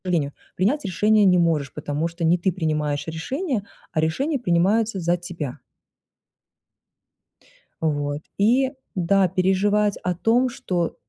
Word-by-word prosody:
Жалению, 160 -6 0 0.2
принять 255 - +1
решение 210 +3 +3
не 180 -1 +5
можешь, 160 -6 +1
потому 150 +2 -2
что 170 +1 -6
не 170 +2 +3
ты 185 +2 +1
принимаешь 150 -4 -1
решение, 235 - -3 0.3
а 160 - -1
решения 270 - 0
принимаются 200 +2 +2
за 175 0 +1
тебя. 170 -6 -6 2.2
Вот. 145 -2 -1 0.2
И, 250 +6 +3 0.2
да, 190 +1 +3
переживать 195 +3 +2
о 180 - 0
том, 230 +8 +2
что, 180 -9 -2
180 Hz, 125 wpm, -23 LUFS, 160-210 Hz, 2.2 s, не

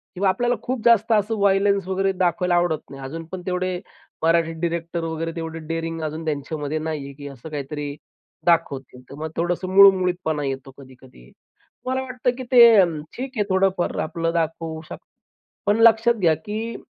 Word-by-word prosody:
किंवा 190 +1 +2
आपल्याला 240 +6 +1
खूप 250 -2 -3
जास्त 230 -1 +4
असं 215 +1 +1
वायलेन्स 200 -1 +2
वगैरे 195 +1 +1
दाखवायला 180 -1 +1
आवडत 175 -3 0
नाही. 135 0 -10
अजून 165 +5 -6
पण 185 - -5
तेवढे 180 0 -1 0.4
मराठी 165 0 +2
डिरेक्टर 170 0 -2
वगैरे 165 0 -3
तेवढे 165 0 -5
डेअरिंग 165 0 -3
अजून 155 +1 -4
त्यांच्यामध्ये 150 0 -3
नाही 155 -2 -4
आहे, 140 - -9
की 145 +1 -9
असं 140 +2 -10
काहीतरी 145 0 -5 0.5
दाखवतील. 135 -7 0
तर - - -9
मग 160 +1 -4
थोडंसं 175 +2 -1
मूळमुळीतपणा 180 -5 +5
येतो 135 0 -5
कधी-कधी. 130 - -16 0.5
मला 260 +1 -1
वाटतं, 255 -1 -1
की 260 - -5
ते 240 -2 +9 0.2
अन् 165 -4 0 0.2
ठीक 260 +1 -4
आहे 210 - +2
थोडंफार 190 -1 +1
आपलं 165 +1 -2
दाखवू 160 -1 -2
शक - - -6 0.7
पण 205 +1 +3
लक्षात 230 +1 +6
घ्या, 175 -6 +3
की 215 +8 -5
170 Hz, 165 wpm, -22 LUFS, 155-195 Hz, 0.7 s, ते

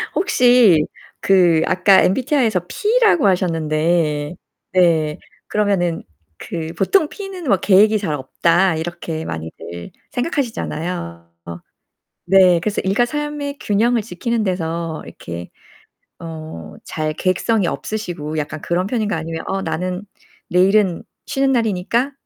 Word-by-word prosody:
혹시 245 - +4 0.4
그 175 -4 +4
아까 190 +1 +5
MBTI에서 235 - +1
P라고 425 - +2
하셨는데 160 -3 0 0.4
네 160 -4 +2 0.3
그러면은 195 -5 0 0.3
그 165 -1 -5
'보통 310 - +2
P는 390 -4 -8
뭐 200 - +4
계획이 210 +4 +4
잘 190 -7 -2
없다.' 170 +6 +1
이렇게 160 -1 -5
많이들 85 +1 -7 0.2
생각하시잖아요. 180 - -3 0.9
네 185 -2 +5
그래서 210 +2 -1
일과 200 +5 +2
삶의 295 +1 -4
균형을 230 +3 +1
지키는 225 +3 -2
데서 165 -3 -3
이렇게 85 +1 -8 0.7
어 160 -1 -8 0.3
잘 155 -1 -3
계획성이 185 +4 0
없으시고 170 -9 -4
약간 155 +1 -4
그런 180 +2 -1
편인가요 215 -6 -1
아니면 165 0 -5
'어 195 0 -2
나는 185 +2 -3 0.4
내일은 185 0 +3 0.2
쉬는 270 -1 +1
날이니까 230 +2 0
185 Hz, 270 characters per minute, -19 LUFS, 160-225 Hz, 0.9 s, 아까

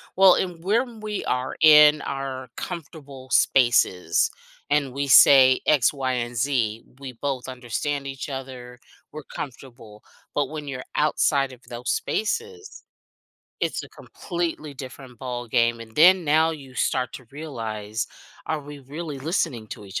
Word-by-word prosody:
Well, 190 -1 +7
and 175 -3 -3
when 230 +4 0
we 215 -1 -4
are 125 +1 -2
in 150 -1 +8
our 135 -2 -5
comfortable 140 -6 -8
spaces, 105 -12 +3 0.4
and 145 -3 +2
we 140 +1 -2
say 130 -1 +7
X, 145 -4 +4
Y, 135 -2 -2
and 120 -1 -3
Z, 115 -4 0 0.2
we 135 -2 -7
both 130 +1 -4
understand 130 +3 -3
each 135 +1 -6
other, 130 -2 -8 0.3
we're 155 0 -8
comfortable. 120 -5 -9 0.3
But 145 -2 0
when 150 -1 -7
you're 130 -2 -5
outside 140 -2 +1
of 125 - -15
those 120 +1 -3
spaces, 445 - -3 0.8
it's - - -1
a - - -13
completely 170 -4 -5
different 130 -2 -10
ball 120 -1 -5
game. 115 +1 +2
And 110 -1 -11
then, 180 +3 +6
now 160 +2 +3
you 140 -5 -9
start 125 0 0
to 130 - -9
realize, 115 -8 -5 0.4
are 155 -1 -2
we 145 0 -10
really 145 +2 -7
listening 140 - -2
to 105 - -8
each 100 0 -5
135 Hz, 145 wpm, -24 LUFS, 125-155 Hz, 0.8 s, in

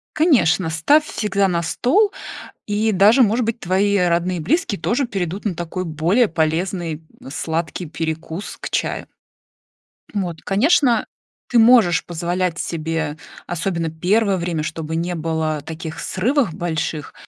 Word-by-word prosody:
Конечно, 225 - +3
ставь 285 - +3
всегда 200 -2 0
на 170 -2 0
стол, 380 - +2 0.6
и 215 +1 +1
даже, 210 +7 +6
может 230 +2 +2
быть, 230 +1 -2
твои 195 +3 +1
родные 175 0 +1
и - - -4
близкие 230 - 0
тоже 250 +7 0
перейдут 190 -2 -3
на 205 -4 -1
такой, 175 +2 -4
более 170 +9 +2
полезный, 165 0 -1 0.3
сладкий, 160 +3 -3
перекус 160 +3 -5
к - - -5
чаю. - - -2 1.1
Вот, 180 -6 -3
конечно, 240 - +3 0.4
ты 240 - +4
можешь 225 -7 +5
позволять 175 +1 -2
себе, 160 -2 -3 0.3
особенно 170 -1 -2
первое 190 +5 +1
время, 170 -3 -2
чтобы 160 0 -4
не 175 +2 -2
было 160 -2 -1
таких 160 +1 -7
срывах 240 - 0
больших, 160 -3 -3
175 Hz, 130 wpm, -20 LUFS, 160-210 Hz, 1.1 s, даже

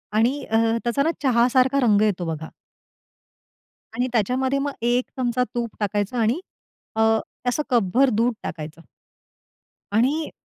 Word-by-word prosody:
आणि 230 +5 +3
अ, 225 - +1 0.3
त्याचा 240 +4 +1
ना 325 - +2
चहासारखा 255 +2 +3
रंग 215 -5 +4
येतो 190 -5 +1
बघा 160 -1 -4 1.5
आणि 250 +1 0
त्याच्यामध्ये 260 +5 +1
मग 285 +1 -1
एक 240 +2 +1
चमचा 250 0 +1
तूप 235 -1 -1
टाकायचं 205 +3 -1
आणि 230 +8 +1 0.6
अ, 220 - +1 0.2
ते 245 - -6
असं 300 +5 -1
कपभर 245 +3 +3
दूध 235 +2 +1
टाकायचं. 160 0 -7 1.1
आणि 270 +9 +1
240 Hz, 130 wpm, -23 LUFS, 215-260 Hz, 1.5 s, रंग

